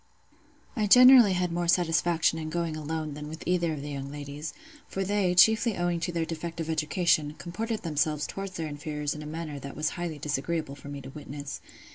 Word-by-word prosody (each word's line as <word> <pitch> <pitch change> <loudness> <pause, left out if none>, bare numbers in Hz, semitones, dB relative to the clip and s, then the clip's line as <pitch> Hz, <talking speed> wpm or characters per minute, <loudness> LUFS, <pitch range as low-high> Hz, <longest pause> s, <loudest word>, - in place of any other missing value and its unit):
I 215 -4 +1
generally 250 -2 +8
had 180 -1 0
more 175 0 -1
satisfaction 170 -1 +2
in 155 0 -4
going 165 -1 -2
alone 155 0 -4
than 150 +1 -7
with 160 +1 -8
either 175 -2 +1
of 145 -2 -6
the 145 - -5
young 140 -1 -5
ladies; 145 +1 -6 0.4
for 195 - -3
they, 195 -2 +1
chiefly 220 +4 +5
owing 175 -1 0
to 170 +1 -2
their 165 -1 -1
defective 165 0 -4
education, 155 -1 +1
comported 220 +5 -4
themselves 150 -2 0
towards 195 -1 -6
their 165 -3 -3
inferiors 150 0 -3
in 150 - -8
a 150 - -7
manner 155 -2 -5
that 140 0 -8
was 155 0 0
highly 175 -3 -4
disagreeable 145 +1 -2
for 140 0 -12
me 140 -1 -6
to 135 0 -10
witness. 145 -1 -7
160 Hz, 195 wpm, -28 LUFS, 150-175 Hz, 0.4 s, generally